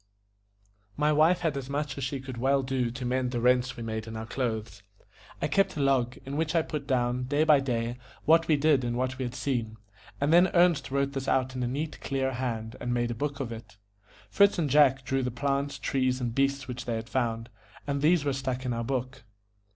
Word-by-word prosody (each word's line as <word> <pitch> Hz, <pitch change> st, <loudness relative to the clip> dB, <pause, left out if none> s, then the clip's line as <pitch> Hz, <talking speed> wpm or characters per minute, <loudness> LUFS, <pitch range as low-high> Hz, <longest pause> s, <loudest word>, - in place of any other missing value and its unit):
My 150 Hz, +1 st, +3 dB
wife 165 Hz, +4 st, +4 dB
had 160 Hz, -4 st, 0 dB
as 135 Hz, -1 st, -5 dB
much 145 Hz, -1 st, -2 dB
as 140 Hz, -, -5 dB
she 135 Hz, +2 st, -2 dB
could 130 Hz, -2 st, -8 dB
well 135 Hz, +2 st, +2 dB
do 130 Hz, -2 st, -1 dB
to 125 Hz, +2 st, -6 dB
mend 125 Hz, 0 st, 0 dB
the 120 Hz, -1 st, -2 dB
rents 125 Hz, +1 st, +2 dB
we 115 Hz, -, -5 dB
made 110 Hz, 0 st, -4 dB
in 110 Hz, 0 st, -6 dB
our 110 Hz, -, -5 dB
clothes. 110 Hz, -4 st, -3 dB, 0.6 s
I -, -, 0 dB
kept 195 Hz, -5 st, +1 dB
a -, -, -2 dB
log, 130 Hz, -3 st, +1 dB
In 140 Hz, +2 st, -4 dB
which 160 Hz, +1 st, -1 dB
I 165 Hz, -, +4 dB
put 150 Hz, -3 st, -5 dB
down, 125 Hz, -1 st, 0 dB
day 145 Hz, +4 st, +1 dB
by 150 Hz, -2 st, +6 dB
day, 120 Hz, -2 st, -2 dB, 0.3 s
what 165 Hz, +1 st, +5 dB
we 155 Hz, -, +4 dB
did 145 Hz, -2 st, +3 dB
and 120 Hz, 0 st, -2 dB
what 130 Hz, +1 st, -2 dB
we 130 Hz, -, -1 dB
had 120 Hz, 0 st, -5 dB
seen; 115 Hz, -6 st, -2 dB, 0.4 s
and 145 Hz, +3 st, +2 dB
then 175 Hz, +2 st, +7 dB
Ernest 175 Hz, -5 st, +4 dB
wrote 140 Hz, +1 st, 0 dB
this 135 Hz, -1 st, -4 dB
out 130 Hz, -1 st, +1 dB
in 130 Hz, -, -3 dB
a 125 Hz, -, 0 dB
neat, 150 Hz, +5 st, -4 dB
clear 135 Hz, -1 st, -1 dB
hand, 115 Hz, -3 st, -3 dB
and 125 Hz, -, -2 dB
made 120 Hz, -1 st, 0 dB
a -, -, -1 dB
book 140 Hz, +4 st, -3 dB
of 130 Hz, -4 st, -3 dB
it. 110 Hz, -3 st, -10 dB, 0.5 s
Fritz 200 Hz, 0 st, +4 dB
and 155 Hz, -6 st, 0 dB
Jack 135 Hz, -2 st, +4 dB
drew 135 Hz, +2 st, 0 dB
the 125 Hz, -, -1 dB
plants, 140 Hz, +3 st, -1 dB
trees, 130 Hz, -2 st, 0 dB
and 120 Hz, -2 st, -2 dB
beasts 140 Hz, 0 st, 0 dB
which 125 Hz, -1 st, -6 dB
they 120 Hz, -, -2 dB
had 110 Hz, 0 st, -5 dB
found, 115 Hz, -2 st, -2 dB, 0.4 s
and 140 Hz, -1 st, -2 dB
these 155 Hz, 0 st, +3 dB
were 140 Hz, -, +1 dB
stuck 130 Hz, -1 st, -3 dB
in 125 Hz, -, -1 dB
our 115 Hz, 0 st, -2 dB
book. 130 Hz, 0 st, -3 dB
130 Hz, 230 wpm, -28 LUFS, 120-140 Hz, 0.6 s, then